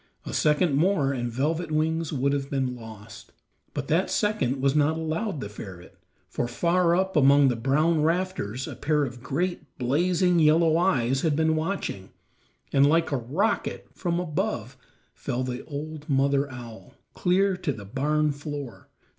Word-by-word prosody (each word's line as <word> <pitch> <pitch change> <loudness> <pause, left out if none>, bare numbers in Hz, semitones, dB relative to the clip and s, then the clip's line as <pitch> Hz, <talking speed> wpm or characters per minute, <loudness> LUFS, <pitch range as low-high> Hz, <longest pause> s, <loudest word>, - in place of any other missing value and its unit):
A - - -6
second 150 +1 +2
more 150 -2 +2
and 120 -2 -3
Velvet 155 +7 -1
Wings 160 +1 0
would 140 -1 +1
have 140 -1 -2
been 130 -2 -1
lost, 110 -3 -12 0.4
but 140 -1 -3
that 170 +5 +1
second 140 - 0
was 135 0 +2
not 150 +1 +2
allowed 160 +1 -2
the - - -4
ferret; 95 -4 -10 0.3
for 120 - -2
far 170 +7 +2
up 190 +1 0
among 140 -1 +6
the 125 - 0
brown 150 +7 +2
rafters 160 - -1
a - - -6
pair 150 0 +1
of 120 -1 -8
great, 150 +2 -3
blazing 175 +7 +2
yellow 160 +1 +4
eyes 135 -8 +2
had 160 -3 +1
been 160 +1 +2
watching, 155 - -3 0.6
and 140 0 +5
like 165 +1 +2
a 140 - +1
rocket 155 - -1
from 175 -2 -1
above 155 - -2 0.4
fell 130 -1 -3
the 125 -1 -4
old 155 +1 -7
mother 140 0 +2
owl, 120 +1 -10 0.2
clear 190 +2 +2
to 180 -4 -2
the 105 -6 -8
barn 150 +7 0
floor. 145 -3 -7
145 Hz, 160 wpm, -26 LUFS, 130-165 Hz, 0.6 s, among